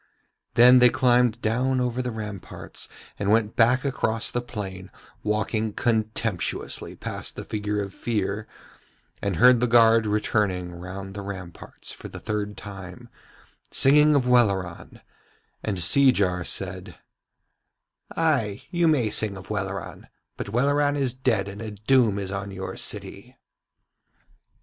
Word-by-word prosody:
Then 125 +1 +8
they 125 0 +7
climbed 120 -2 +2
down 125 +4 +1
over 125 0 -1
the 125 - -3
ramparts 105 -5 -7 0.3
and 100 - -1
went 110 0 +2
back 125 +4 +3
across 115 -4 -1
the 120 - -1
plain, 95 -6 -7 0.3
walking 110 +1 -1
contemptuously 110 -4 -2
past - - -7
the - - -6
figure 105 -1 -3
of 100 -1 -8
Fear, 105 -2 -2 0.7
and 100 -2 -1
heard 125 +4 +6
the 125 - +1
guard 115 -1 +5
returning 105 -4 0
round 95 +3 -8
the 100 - -6
ramparts 95 -3 -9
for - - -9
the - - -9
third 105 -1 -3
time, 100 +4 -10 0.6
singing 150 +2 +5
of 135 -3 +2
Welleran; 100 -8 +1 0.6
and 105 -3 -3
Seejar 95 -2 +3
said: 95 -1 -3 1.2
'Ay, 135 -11 +1
you 175 -1 +2
may 130 -9 +2
sing 105 -3 +2
of 95 +2 -10
Welleran, 95 -2 -5 0.3
but - - -6
Welleran 145 +5 +2
is 135 -4 0
dead 125 -7 0
and 100 +2 -8
a 110 - -5
doom 110 +1 +2
is 100 -1 -3
on 100 0 -4
your 95 -1 -6
city.' - - -4
110 Hz, 135 wpm, -25 LUFS, 100-125 Hz, 1.2 s, Then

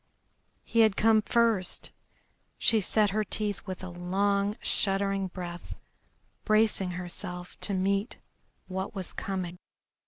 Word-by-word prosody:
He 230 - 0
had 220 -3 +5
come 220 0 +5
first! 225 -4 +1 0.7
She 220 -2 +3
set 210 +1 +2
her 215 +2 +1
teeth 205 -1 -1
with 185 0 -5
a 185 - -4
long, 200 +4 0
shuddering 195 0 +1
breath, 175 -1 -7 0.7
bracing 215 -3 +3
herself 180 0 -6
to 200 - 0
meet 195 +4 0 0.5
what 190 +2 -4
was 190 -2 -5
coming. 180 -2 -3
195 Hz, 120 wpm, -29 LUFS, 185-215 Hz, 0.7 s, had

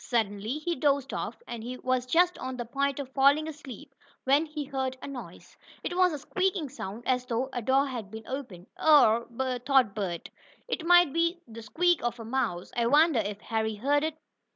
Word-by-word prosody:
Suddenly 220 +1 -1
he 340 +3 -2
dozed 280 -2 +1
off, - - -4
and 235 -2 -6
he 250 +2 -5
was 255 0 -1
just 350 +6 +3
on 255 0 -5
the 240 - -4
point 275 +3 -1
of 265 -2 -6
falling 285 +3 +4
asleep, 285 -2 -10 0.3
when 285 +4 +3
he 300 -1 -5
heard 265 -2 -3
a - - -8
noise. 270 -3 -10 0.3
It 350 - -3
was 365 0 +4
a 300 - -3
squeaking 370 +1 -1
sound, 230 -4 -7
as 250 -1 +2
though 250 +2 -1
a 245 - -2
door 265 +4 +3
had 240 -7 -5
been 220 +1 -9
opened. 240 -10 -6 0.2
"Or," 235 -7 +6 0.4
thought 255 -6 +3
Bert, 185 -5 -4 0.4
"it 365 - -3
might 350 -4 +6
be 335 +1 +1
the 230 0 -10
squeak 345 +9 +1
of 240 0 -2
a 225 - -7
mouse. 220 -8 -2
I 235 -1 +1
wonder 300 0 +5
if 205 0 -3
Harry 220 -2 -2
heard 285 +7 +1
it?" 315 0 -2
265 Hz, 200 wpm, -28 LUFS, 230-300 Hz, 0.4 s, Or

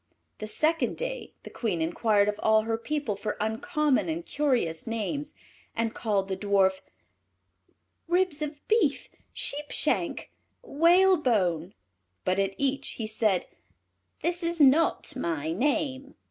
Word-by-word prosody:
The 215 - -5
second 315 +9 +1
day - - -5
the - - -10
Queen 205 -8 -2
inquired 200 +5 +2
of 210 0 -1
all 220 0 +4
her 225 0 -1
people 235 -1 -2
for 210 +1 -4
uncommon 295 +7 0
and 330 +1 -3
curious 245 - 0
names, 230 +7 -3 0.4
and 230 0 -1
called 205 -5 -1
the 190 - -2
Dwarf 190 -1 +2 1.3
"Ribs 350 -3 +1
of 295 -1 -5
Beef," 410 -11 +1 0.2
"Sheep 290 +1 -3
shank," - - 0 0.3
"Whalebone," 280 - +3 0.5
but 185 +1 +1
at 195 0 0
each 275 0 0
he 225 - -3
said, 215 -4 +1 0.8
"This 350 +1 -1
is 335 0 -1
not 300 +1 +4
my 160 - -2
name." 275 - -1
245 Hz, 130 wpm, -27 LUFS, 205-305 Hz, 1.3 s, all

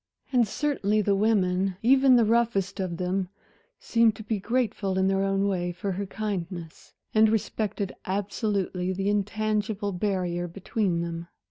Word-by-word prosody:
And 240 -3 +4
certainly 215 -6 0
the 200 0 +2
women, 195 -3 +1
even 265 +1 +6
the 235 -2 +5
roughest 215 -4 +1
of 180 -3 -2
them, 185 +1 -1 0.5
seemed 230 -2 +2
to 220 - -9
be 215 -1 -2
grateful 210 -3 -1
in 190 0 +3
their 195 0 +2
own 195 0 +1
way 180 -3 -1
for 185 +3 -4
her 195 +2 -3
kindness, 185 -3 -5 0.2
and 220 0 +5
respected 210 -2 -1
absolutely 195 -2 -1
the 195 +2 -1
intangible 210 0 -1
barrier 180 -2 -1
between 185 0 -1
them. 170 0 -5
200 Hz, 145 wpm, -27 LUFS, 185-215 Hz, 0.5 s, even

